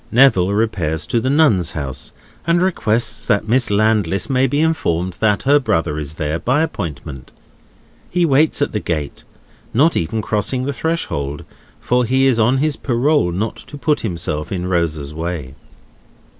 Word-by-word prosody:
Neville 115 -7 +5
repairs 100 -7 -1
to 120 - 0
the 130 +3 -1
Nuns' 115 - +3
House, 70 -4 -5 0.4
and 170 +1 +3
requests 120 - 0
that 100 +1 +1
Miss 125 +2 +2
Landless 105 +2 +1
may 130 0 +3
be 145 +3 0
informed 95 - 0
that 105 -2 +2
her 145 +2 +5
brother 80 - -1
is 75 0 -6
there, 80 0 -2
by 130 - +1
appointment. 75 - -6 0.8
He 175 -1 +1
waits 145 0 +3
at - - -2
the 105 - -1
gate, 75 -7 -4 0.5
not 155 +7 +4
even 105 +7 -1
crossing 115 +5 -1
the 140 +2 -2
threshold; 75 - -3 0.3
for 125 0 +1
he 130 +3 +2
is 130 -4 +3
on 120 +4 +3
his 150 +1 0
parole 130 - +1
not 105 +6 -3
to 145 - -11
put 150 +1 +1
himself 85 -6 -3
in 90 -2 -2
Rosa's 80 -5 -1
way. 80 -4 -4
110 Hz, 160 wpm, -18 LUFS, 85-135 Hz, 0.8 s, Neville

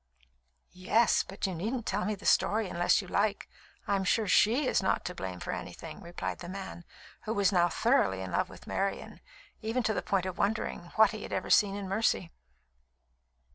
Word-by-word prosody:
"Yes; 205 +5 +3
but 195 - -5
you 190 - -1
needn't 220 +8 -3
tell 200 +2 -1
me 215 - -1
the - - -14
story 215 0 +3
unless 175 +3 +2
you - - -11
like. 205 +2 0 0.4
I'm 195 -1 +1
sure 215 +3 +1
she 230 +9 +4
is - - +2
not 190 - 0
to 180 - -3
blame 95 - -6
for - - -4
anything," - - -7
replied 175 0 -5
the 175 - -8
man, 190 -2 -7 0.4
who 220 +1 -2
was 200 -1 +3
now 175 -2 +3
thoroughly 220 - +2
in 95 -1 -5
love - - 0
with - - -13
Marian, 195 0 -3 0.4
even 230 +3 -1
to 220 0 +1
the - - -1
point 190 -2 0
of 185 - -5
wondering 200 -4 -1
what 220 -2 +6
he 215 -2 -7
had - - -7
ever - - -2
seen 200 -1 +5
in 200 -1 -5
Mercy. 195 -3 0
200 Hz, 195 wpm, -30 LUFS, 180-220 Hz, 0.4 s, what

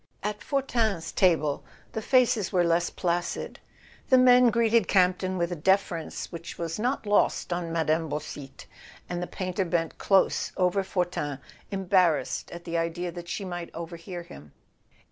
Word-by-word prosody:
At 210 0 -3
Fortin's 230 - -1
table 155 -6 +2 0.3
the 220 - -3
faces 235 -5 +3
were 180 -2 +3
less 170 0 +2
placid. 175 0 -2 0.5
The 260 - +7
men 250 -1 +7
greeted 230 -2 +3
Campton 185 0 +2
with 170 0 -1
a - - -1
deference 175 0 0
which 170 -1 -8
was 165 +2 -4
not 245 +1 -1
lost 205 -3 +2
on 175 -1 -3
Mme. 160 -1 +1
Beausite, 145 -2 -6 0.4
and 175 0 -3
the 175 - -3
painter 185 +1 -2
bent 170 -2 -2
close 195 -1 +2
over 180 +1 +2
Fortin, 175 -7 -2 0.3
embarrassed 185 -4 +1
at 175 0 -9
the 170 0 -2
idea 170 +1 -2
that 175 0 -9
she 195 - -3
might 175 -2 -5
over¬ 170 +1 -6
hear 175 +1 -7
him. 75 - -13
175 Hz, 155 wpm, -27 LUFS, 170-200 Hz, 0.5 s, The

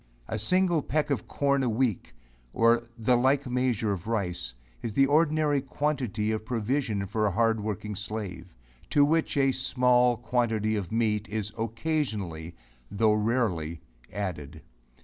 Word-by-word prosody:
A 110 - -3
single 175 - +3
peck 150 +1 -1
of 140 - -1
corn 140 -1 +1
a 125 - +1
week, 115 - -1 0.4
or 115 +1 +3
the 120 +2 +3
like 130 +3 +2
measure 125 -4 0
of 95 0 -4
rice, 90 - -2 0.3
is 110 -2 -5
the 135 - +5
ordinary 150 -1 +2
quantity 130 -7 -1
of 110 -1 -2
provision 115 -2 -1
for 105 +2 0
a - - 0
hard 115 +2 +2
working 105 0 -4
slave; 105 -1 -6 0.4
to 145 -1 +5
which 160 0 +1
a 135 -1 +4
small 125 -2 +3
quantity 115 -2 0
of 100 -3 -4
meat 110 -2 0
is 105 0 -3
occasionally, 110 - -3 0.3
tho' 105 +1 +2
rarely, 105 -8 0 0.3
added. 80 -6 -5
115 Hz, 145 wpm, -27 LUFS, 105-130 Hz, 0.4 s, the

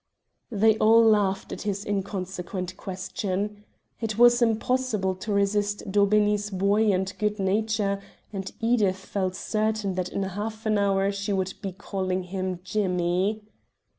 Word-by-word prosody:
They 220 -1 +3
all 225 +1 +6
laughed 205 -3 +2
at - - -5
this 205 -1 -3
inconsequent 185 -2 -3
question. 195 +2 -4 0.4
It 220 -2 -3
was 240 +1 +6
impossible 225 -3 +1
to 210 +3 -5
resist 205 0 0
Daubeney's 205 +1 +3
buoyant 200 0 +2
good 210 -1 0
nature, 200 0 0 0.3
and 195 -1 -4
Edith 225 -5 +2
felt 190 -1 -3
certain 215 -2 -1
that 185 0 -2
in 200 - -2
half 210 +4 -5
an 215 -1 +2
hour 195 0 +2
she 200 +1 -3
would 190 -1 -1
be 195 - -3
calling 190 -1 -3
him 185 -1 -4
"Jimmy." 185 +1 0
200 Hz, 135 wpm, -26 LUFS, 190-215 Hz, 0.4 s, all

